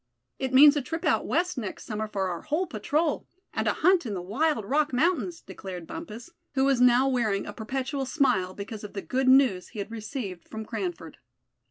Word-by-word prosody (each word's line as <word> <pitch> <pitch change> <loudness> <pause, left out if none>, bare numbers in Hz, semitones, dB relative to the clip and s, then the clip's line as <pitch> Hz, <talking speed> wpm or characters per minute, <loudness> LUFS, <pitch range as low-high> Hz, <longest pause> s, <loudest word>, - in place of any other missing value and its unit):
"It 265 -1 -2
means 285 +3 +8
a 290 - +1
trip 325 +6 -5
out 305 - +2
West 350 -3 0
next 210 -5 -6
summer 215 0 -3
for 195 -2 -2
our 175 -2 -4
whole 310 +5 -1
patrol; 300 - -1 0.3
and - - -1
a - - +3
hunt 370 -1 +5
in 215 -6 -4
the - - -3
wild 230 - 0
Rock 295 +6 +1
Mountains;" 340 +5 +1
declared 180 -3 -8
Bumpus, 230 - -8 0.2
who 265 0 +3
was 270 -3 +3
now 250 +1 +5
wearing 225 -7 0
a - - -7
perpetual 265 +4 -3
smile, 190 - +1
because 210 +1 -7
of 210 - -8
the 195 - -5
good 260 +1 -1
news 260 -9 +5
he - - -13
had 205 +2 -4
received 215 - -6
from 220 0 -6
Cranford. 355 - -5
255 Hz, 200 wpm, -27 LUFS, 210-295 Hz, 0.3 s, means